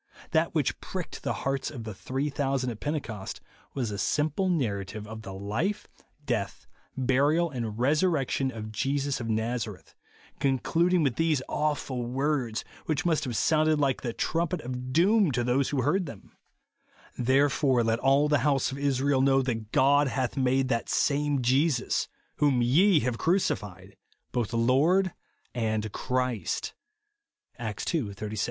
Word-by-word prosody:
That - - +1
which - - 0
pricked - - -6
the - - -2
hearts 135 0 -1
of 125 -7 -7
the 110 -1 -6
three 135 +8 -3
thousand 135 -3 -1
at 110 - -8
Pentecost 130 -10 -4 0.4
was 120 -5 -1
a 100 - -4
simple 155 - 0
nar 130 - +1
rative 105 +2 -8
of 110 +1 -8
the 110 - -8
life, 105 - -2 0.4
death, - - -2 0.3
burial, 140 +6 +2
and 115 -5 -4
resur 150 +9 +3
rection 135 -4 0
of 110 -2 -7
Jesus 140 +4 -1
of 115 -2 -4
Nazareth, 110 +1 -3 0.5
concluding 165 +6 +2
with 130 -5 0
these 160 -5 +1
awful 145 -4 -1
words, 130 -2 -1 0.2
which 155 0 0
must 160 -3 +1
have 120 -4 -3
sounded 155 -1 +3
like 135 -3 +1
the 120 - -2
trumpet 170 +7 -1
of 125 0 -5
doom 190 - +4
to 120 0 0
those 125 +3 +1
who 135 -3 0
heard 175 +6 +1
them, 115 -8 -11 0.5
" - - -29
Therefore 130 0 +3
let 115 0 +1
all 135 +3 +4
the 150 -2 +3
house 140 0 +1
of 135 - -6
Israel 140 -1 +2
know, 135 0 +4
that 115 -4 -3
God 145 +1 +4
hath 130 -1 -1
made 130 0 +2
that 115 -2 -1
same 145 -2 +1
Jesus, 135 +2 +2 0.3
whom 140 -5 +3
ye 160 +7 +4
have 120 -2 -2
crucified, 100 - -1 0.4
both 120 -3 -1
Lord 145 +11 +3 0.4
and 110 -2 -1
Christ," 125 -2 -2 0.9
(Acts 110 -3 -4
ii. 135 -12 -1
36). 105 +1 -5
135 Hz, 155 wpm, -28 LUFS, 120-150 Hz, 0.9 s, doom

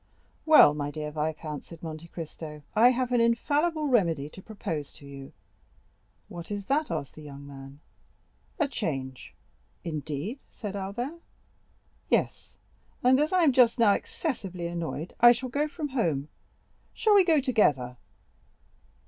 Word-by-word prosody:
"Well, 305 - +8
my 145 -1 -3
dear 150 0 -5
viscount," 150 0 -3
said 170 -1 -13
Monte 160 0 -7
Cristo, 155 -2 -8
"I 235 +3 +7
have 255 0 0
an 245 -1 +3
infallible 300 +7 +1
remedy 170 - +2
to 190 - -12
propose 165 -9 -5
to 140 - -15
you." 140 -1 -10 1.0
"What 170 -1 -9
is 205 -1 -4
that?" 295 +5 +1
asked 140 - -4
the 155 - -12
young 140 -1 -10
man. 140 0 -11 0.8
"A 310 -5 +2
change." 135 - -4 0.5
"Indeed?" 155 - -4
said 205 -3 -6
Albert. 240 - -4 0.9
"Yes; - - 0 0.5
and 255 +2 +5
as 300 +2 +1
I 365 -2 +4
am 290 -5 +5
just 245 -2 +5
now 225 -4 +5
excessively 195 - -4
annoyed, 170 -1 -4
I 240 0 +9
shall 255 +1 -5
go 290 +5 0
from 300 -1 -5
home. 160 - -1 0.7
Shall 435 - +3
we 400 -2 +7
go 325 -4 +4
together?" 150 - +1
190 Hz, 145 wpm, -28 LUFS, -, 1.0 s, I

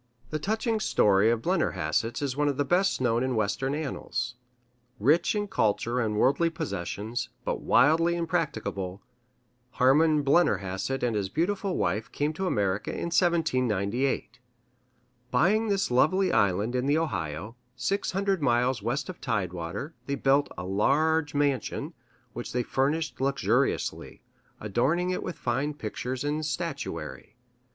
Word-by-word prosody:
The 155 - -1
touching 220 - 0
story 105 - +3
of 115 -1 0
the - - -7
Blennerhassetts 115 - 0
is 135 -3 -1
one 150 +1 +1
of 140 -2 0
the 145 - +1
best 185 +6 +2
known 120 -2 +1
in 130 -1 0
Western 115 +6 0
annals. 125 -5 -3 0.7
Rich 155 - +3
in 205 0 -1
culture 115 - 0
and 110 -3 0
worldly 140 +9 +3
possessions, 120 - -4 0.2
but - - -2
wildly 165 +5 +4
impracticable, 110 - -2 0.7
Harman 150 +4 +4
Blennerhassett 135 - +1
and 120 -3 +1
his 100 -2 -1
beautiful 190 - -1
wife 110 +2 -1
came 150 +2 -1
to 190 +4 -2
America 100 - 0
in 170 - -3
1798. 130 - +1 0.9
Buying 195 - +3
this 200 -8 0
lovely 185 +9 +3
island 100 +4 +2
in 125 +1 0
the 145 +2 +3
Ohio, 95 - -3 0.2
six 155 +13 -1
hundred 195 -2 0
miles 125 -2 +2
west 120 +7 -2
of 185 - -8
tidewater, 100 - -3
they 140 - 0
built 140 +1 +2
a 90 - -5
large 145 +11 +1
mansion, 145 -2 -1 0.4
which - - -6
they 125 0 +1
furnished 145 +5 -1
luxuriously, 140 +1 0 0.4
adorning 135 - 0
it 180 - -2
with 180 - -5
fine 135 +5 -1
pictures 125 +2 -4
and 150 +2 -1
statuary. 145 -5 -4
135 Hz, 140 wpm, -27 LUFS, 110-160 Hz, 0.9 s, wildly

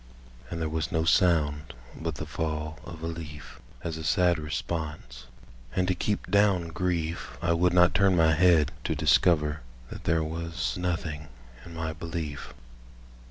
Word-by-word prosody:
And 85 - -4
there 80 - -1
was 80 +2 -2
no 80 -2 +1
sound 80 -4 +2 0.2
but - - -4
the - - -5
fall 80 -1 -3
of 80 -1 -9
a - - -1
leaf 80 -3 -7 0.2
As 80 -1 -3
a 80 - -6
sad 90 0 +3
response; 75 -6 -5 0.5
and 90 -1 +1
to 90 - +3
keep 105 +3 -2
down 100 -5 +3
grief 85 -1 -2
I 85 0 +1
would 90 +2 +3
not 90 0 +5
turn 95 -2 +4
my 80 -1 +4
head 80 -3 +4
to - - 0
discover 75 -3 +3 0.3
That - - -8
there 80 -1 +2
was 85 +2 -3
nothing 85 -4 -3 0.4
in 85 - -11
my 80 -1 -3
belief. 80 -2 -5
80 Hz, 160 wpm, -28 LUFS, 80-90 Hz, 0.5 s, not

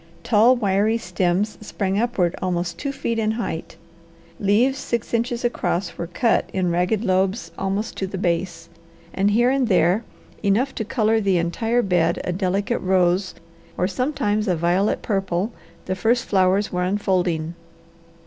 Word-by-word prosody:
Tall, 230 +3 +5
wiry 210 0 +1
stems 180 +1 -1
sprang 195 -1 -1
upward 215 -7 0
almost 175 -1 -2
two 280 - -2
feet 230 -4 -2
in 215 0 +1
height; 220 -8 -4 0.6
leaves 235 +7 +2
six 235 -1 -3
inches 235 +1 0
across 195 -6 -1
were 170 - -5
cut 225 +7 +1
in 185 -2 0
ragged 180 +5 +1
lobes 190 +3 0
almost 195 +3 -3
to 190 - -2
the 190 - -5
base, 170 -2 -2 0.5
and 195 +1 +2
here 240 +4 +3
and 270 -2 +1
there, 185 +2 +3 0.4
enough 230 +7 +1
to 220 - -3
colour 220 0 +1
the 195 -3 +2
entire 225 +8 0
bed 175 -3 +1
a - - -2
delicate 195 +5 -1
rose 185 0 +1 0.4
or 180 - +1
sometimes 215 -1 -1
a 180 - +2
violet 175 +5 +1
purple, 195 0 -1 0.3
the 185 - -1
first 225 +6 +1
flowers 190 +1 +2
were 180 - -1
unfolding. 180 -4 0
195 Hz, 150 wpm, -22 LUFS, 180-225 Hz, 0.6 s, Tall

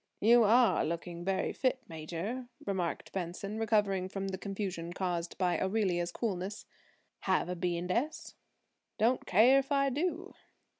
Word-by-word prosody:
"You 235 +2 +6
are 235 +3 +5
looking 170 +1 -4
very 190 +1 0
fit, 260 -1 0
Major," 170 +10 -5 0.2
remarked 185 -4 -2
Benson, 195 +4 -4
recovering 205 -4 +1
from 195 0 -3
the 190 - -3
confusion 190 -4 -4
caused 175 -2 -2
by 180 -2 +1
Aurelia's 190 -4 0
coolness. 200 -1 -3 0.5
"Have - - +1
a 180 - -2
B. 175 0 -1
and 180 +1 -3
S.?" 290 +10 -2 0.6
"Don't 240 +4 +2
care 240 +8 +6
if 275 +1 -5
I 275 -1 +3
do." 345 +6 -2
195 Hz, 145 wpm, -32 LUFS, 175-235 Hz, 0.6 s, You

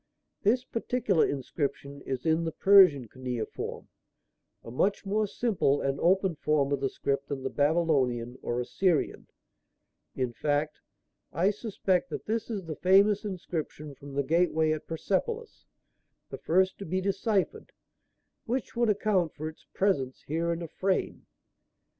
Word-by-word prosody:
This 245 +5 +2
particular 230 -7 +1
inscription 140 0 -4
is 130 -2 -3
in 160 +1 +2
the 165 - -2
Persian 180 - +6
cuneiform, 125 -2 -5 0.8
a 115 - -9
much 195 - 0
more 210 +2 +1
simple 195 - +1
and 135 0 -1
open 190 +1 +3
form 150 -2 +1
of 140 - +1
the 135 0 0
script 140 +1 -2
than 135 -2 -4
the 135 - -2
Babylonian 135 -6 +1
or 120 +1 -2
Assyrian; 165 +6 0 0.9
in 125 -2 -1
fact, 150 +3 -1 0.5
I 185 +4 +2
suspect 205 0 -1
that - - -6
this 225 +2 -2
is 200 -5 -4
the 160 -1 -5
famous 195 +2 +4
inscription 165 -6 -5
from 140 +1 -11
the 140 - +1
gateway 160 +1 +2
at 155 -1 -3
Persepolis 435 - -3 0.6
the - - -6
first 185 +3 +2
to 200 - -6
be 185 +3 0
deciphered; 195 +1 -1 0.7
which 250 +2 -3
would 235 -1 +2
account 200 -5 +1
for 155 +1 -5
its 160 - -10
presence 140 -10 0
here 165 +3 -1
in 170 0 -3
a - - -5
frame. 190 +4 -2
165 Hz, 145 wpm, -28 LUFS, 140-195 Hz, 0.9 s, Persian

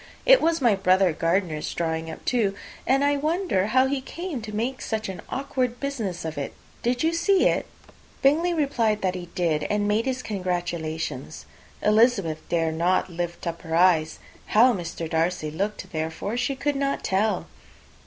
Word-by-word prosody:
It - - +7
was 330 -1 +2
my 235 -3 +5
brother 190 -2 +3
Gardiner's 165 -1 0
drawing 160 -1 -2
up, 160 - -9
too, 215 -6 +1 0.3
and 270 +2 +3
I 285 0 +3
wonder 310 - 0
how 260 +4 +4
he 270 0 -1
came 330 -1 -5
to 215 0 -7
make 235 +5 -2
such 220 -1 -2
an 190 - -6
awkward 255 -3 -2
business 220 -12 -3
of 160 -2 -4
it. 140 - -5 0.3
Did 245 +3 0
you 325 +1 +2
see 375 +3 +3
it?" - - 0 0.6
Bingley 315 +6 +4
replied 260 -10 +1
that 185 -1 +1
he 180 -1 -6
did, 165 -4 +1
and 205 0 +1
made 215 +4 +1
his 255 -1 -2
congratulations. 170 -7 -3 0.4
Elizabeth 210 -7 +3
dared 165 -2 0
not 180 +1 +2
lift 170 0 -4
up 170 -1 -4
her 160 0 -3
eyes. 165 -3 +4 0.3
How 240 +4 +5
Mr. 170 -3 -4
Darcy 160 -1 0
looked, 190 +2 -3
therefore, 160 +7 -3
she 250 +3 -1
could 290 +2 -1
not 275 0 -1
tell. 210 +2 +1
205 Hz, 170 wpm, -25 LUFS, 170-260 Hz, 0.6 s, It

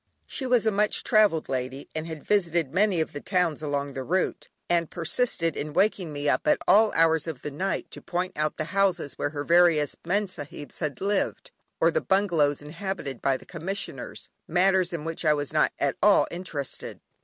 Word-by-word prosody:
She 265 - -4
was 245 -3 +3
a 220 - +3
much 210 +1 +1
travelled 205 -7 +3
lady 130 +1 -4
and 155 +1 -4
had 160 -3 -7
visited 170 -8 +1
many 190 -2 +3
of 160 - -3
the 145 - -6
towns 180 -5 0
along 145 -2 -2
the 135 - -4
route, 180 +8 -1 0.2
and 170 -2 +1
persisted 170 -2 0
in 150 +1 -4
waking 190 -3 +1
me 145 0 -3
up - - +1
at - - +5
all 220 +2 +6
odd - - -9
hours 160 -1 +3
of 155 -6 -6
the 150 - -4
night, 185 +8 -3
to - - -7
point 180 +2 -3
out 155 0 -1
the - - -1
houses 190 -7 +1
where - - 0
her 145 -1 -4
various 170 -3 +4
Mem 200 +5 +1
Sahibs 145 -5 -8
had 150 -4 -3
lived, 200 +1 -1 0.3
or - - +4
the 485 - 0
bungalows 165 - +1
inhabited 155 - -5
by 135 -1 +2
the - - -16
commissioners, 185 +4 -5 0.2
matters 185 0 +3
in 165 -3 -5
which 165 +1 -3
I 155 -2 +4
was 145 -1 -3
not - - +3
at - - 0
all - - +5
interested. 170 -6 -5
165 Hz, 200 wpm, -26 LUFS, 150-190 Hz, 0.3 s, all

